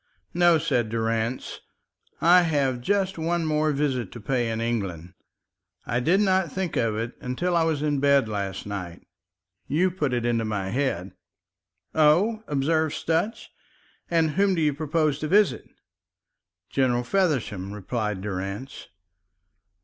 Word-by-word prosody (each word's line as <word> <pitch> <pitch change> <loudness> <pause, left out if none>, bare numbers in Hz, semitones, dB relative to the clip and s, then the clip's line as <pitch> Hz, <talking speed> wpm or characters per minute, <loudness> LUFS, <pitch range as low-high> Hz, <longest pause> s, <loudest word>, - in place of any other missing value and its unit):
"No," 175 -1 +5
said 120 -6 0
Durrance, 115 +2 -2 0.6
"I 175 +2 +7
have 140 -7 0
just 195 +4 0
one 165 +1 0
more 155 0 +1
visit 135 -7 -1
to 120 - -8
pay 120 +1 -1
in 110 0 -2
England. 95 -7 -3 0.7
I 120 - 0
did 170 +10 +3
not 190 -5 +2
think 185 -1 -3
of 115 -2 +1
it 115 +2 -3
until 170 +8 -1
I 170 - +4
was 155 -3 0
in 145 -2 +1
bed 140 -3 +4
last 100 -3 -4
night. 90 -4 -6 0.6
You 180 +5 +2
put 155 -7 -1
it 120 -1 -1
into 115 -1 +1
my 105 -3 -2
head." 100 -7 -1 0.8
"Oh," 180 +9 +3
observed 155 +2 +1
Sutch, 165 +8 -2 0.6
"and 165 -2 +2
whom 195 +3 +2
do 165 - 0
you 150 -1 +2
propose 155 0 0
to 155 - -3
visit?" 205 +4 +2 1.0
"General 125 -2 +1
Feversham," 125 - 0
replied 105 -1 -3
Durrance. 100 +5 -5
140 Hz, 140 wpm, -25 LUFS, 115-165 Hz, 1.0 s, I